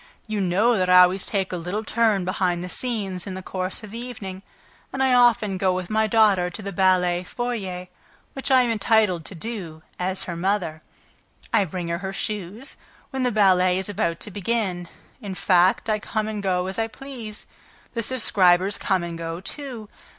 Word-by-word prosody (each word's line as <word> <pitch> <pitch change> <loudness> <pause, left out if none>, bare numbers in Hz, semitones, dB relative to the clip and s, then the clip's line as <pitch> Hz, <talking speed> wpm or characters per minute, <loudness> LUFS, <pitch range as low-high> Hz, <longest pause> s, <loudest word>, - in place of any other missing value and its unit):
You 215 -2 -2
know 205 +6 +3
that 185 -1 +1
I 180 0 +9
always 185 +1 +2
take 195 -3 -1
a - - -1
little 180 +6 -3
turn 220 -4 +2
behind 180 -1 0
the 180 - -5
scenes, 200 -6 -2
in 185 - -5
the 190 - -7
course 185 +3 -4
of 210 - -9
the 230 - -6
evening, 205 -6 -7 0.5
and 265 0 -1
I 260 -1 +3
often 230 -6 +4
go 185 -1 +2
with 185 0 -4
my 220 0 +2
daughter 205 -5 +4
to 180 - -8
the 200 - -4
ballet 180 -1 +2
foyer, 195 -5 -4 0.5
which 270 +1 -4
I 260 -2 +6
am 240 - 0
entitled 210 -5 +2
to 195 - -7
do, 170 -6 -6 0.2
as 185 +1 -1
her 170 - -5
mother; 175 -3 -1 0.7
I 200 - +4
bring 175 0 -5
her 170 0 -1
her 190 0 -5
shoes, 210 +5 -4 0.3
when 265 - -2
the 250 -1 +2
ballet 185 -3 +4
is 190 +1 -2
about 170 -4 -1
to 210 - -3
begin... 195 -3 -2 0.3
in 200 -4 -5
fact, 185 +1 +3
I 215 -1 +1
come 215 0 -2
and 215 -1 -3
go 180 -2 0
as 190 +3 -4
I 225 - +1
please... 235 -4 -8 0.5
The 230 - -1
subscribers 195 -6 +3
come 190 -3 +1
and 170 -1 -5
go 165 0 -4
too... 240 +1 -6
195 Hz, 195 wpm, -24 LUFS, 180-220 Hz, 0.7 s, I